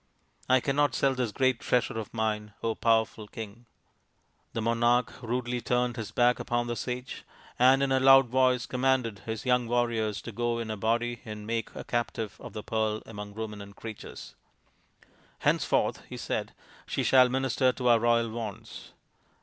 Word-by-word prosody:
I 130 Hz, 0 st, +6 dB
cannot 145 Hz, +2 st, +1 dB
sell 135 Hz, -1 st, +2 dB
this 125 Hz, -4 st, -1 dB
great 130 Hz, +1 st, +1 dB
treasure 120 Hz, -2 st, 0 dB
of 110 Hz, -, -7 dB
mine, 105 Hz, -2 st, -2 dB, 0.3 s
powerful 110 Hz, -2 st, +2 dB
King! 115 Hz, +1 st, -9 dB, 0.4 s
" -, -, -43 dB
The -, -, -2 dB
monarch 120 Hz, +1 st, +2 dB
rudely 120 Hz, 0 st, -2 dB
turned 125 Hz, 0 st, 0 dB
his 110 Hz, -4 st, -5 dB
back 120 Hz, +2 st, +3 dB
upon 120 Hz, 0 st, -1 dB
the 120 Hz, 0 st, -3 dB
sage, 125 Hz, +2 st, -5 dB, 0.4 s
and 130 Hz, +2 st, +6 dB
in 135 Hz, -, +1 dB
a 130 Hz, -, +4 dB
loud 135 Hz, 0 st, +7 dB
voice 125 Hz, 0 st, +2 dB
commanded 125 Hz, -5 st, 0 dB
his 110 Hz, +3 st, -4 dB
young 125 Hz, -1 st, +2 dB
warriors 115 Hz, -3 st, 0 dB
to 115 Hz, -, -6 dB
go 120 Hz, +2 st, -1 dB
in 115 Hz, -1 st, -4 dB
a -, -, -2 dB
body 115 Hz, +3 st, -1 dB
and 105 Hz, -3 st, -7 dB
make 115 Hz, +1 st, -2 dB
a -, -, -6 dB
captive 115 Hz, -3 st, -3 dB
of -, -, -10 dB
the 105 Hz, -, -6 dB
Pearl 110 Hz, -1 st, -1 dB
among 105 Hz, -2 st, -8 dB
Ruminant 105 Hz, -2 st, -7 dB
Creatures. 110 Hz, -2 st, -9 dB, 0.5 s
" -, -, -31 dB
Henceforth," -, -, +2 dB
he -, -, -7 dB
said, -, -, -3 dB, 0.2 s
" -, -, -24 dB
she -, -, -1 dB
shall 130 Hz, -1 st, +6 dB
minister 130 Hz, 0 st, +2 dB
to 125 Hz, -1 st, -3 dB
our 120 Hz, -1 st, +6 dB
royal 115 Hz, 0 st, +2 dB
wants." 110 Hz, -3 st, -7 dB
120 Hz, 175 wpm, -28 LUFS, 110-125 Hz, 0.5 s, loud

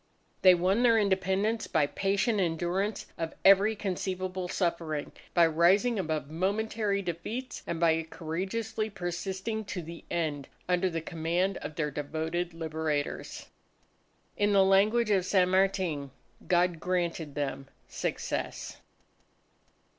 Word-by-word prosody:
They 185 Hz, -1 st, +8 dB
won 185 Hz, +6 st, +2 dB
their 235 Hz, -2 st, +5 dB
Independence 200 Hz, +2 st, +1 dB
by 155 Hz, -3 st, +2 dB
patient 200 Hz, +7 st, 0 dB
endurance 180 Hz, +4 st, -1 dB
of 165 Hz, -1 st, -3 dB
every 200 Hz, +3 st, +6 dB
conceivable 185 Hz, -2 st, -3 dB
suffering, 165 Hz, -5 st, -2 dB, 0.2 s
by 170 Hz, -1 st, +7 dB
rising 190 Hz, +8 st, +3 dB
above 155 Hz, -5 st, -2 dB
momentary 200 Hz, +3 st, 0 dB
defeats, 210 Hz, +9 st, -5 dB
and 165 Hz, -, -2 dB
by 165 Hz, -1 st, +3 dB
courageously 215 Hz, +8 st, -3 dB
persisting 190 Hz, +3 st, -3 dB
to 185 Hz, -3 st, -5 dB
the 170 Hz, +1 st, -9 dB
end 155 Hz, -5 st, -2 dB, 0.2 s
under 180 Hz, +1 st, +2 dB
the 165 Hz, -1 st, -3 dB
command 170 Hz, +4 st, -1 dB
of 150 Hz, +1 st, -7 dB
their 150 Hz, -2 st, -1 dB
devoted 160 Hz, +4 st, -3 dB
Liberators. 160 Hz, -3 st, -3 dB, 0.9 s
In 205 Hz, 0 st, +2 dB
the 195 Hz, -1 st, +6 dB
language 210 Hz, +4 st, +4 dB
of 190 Hz, -3 st, +3 dB
San 185 Hz, -1 st, +3 dB
Martin, 185 Hz, -7 st, +1 dB, 0.4 s
"God 175 Hz, -1 st, +2 dB
granted 170 Hz, -4 st, -2 dB
them 135 Hz, -2 st, -3 dB, 0.2 s
success." -, -, -3 dB
180 Hz, 120 wpm, -29 LUFS, 165-200 Hz, 0.9 s, They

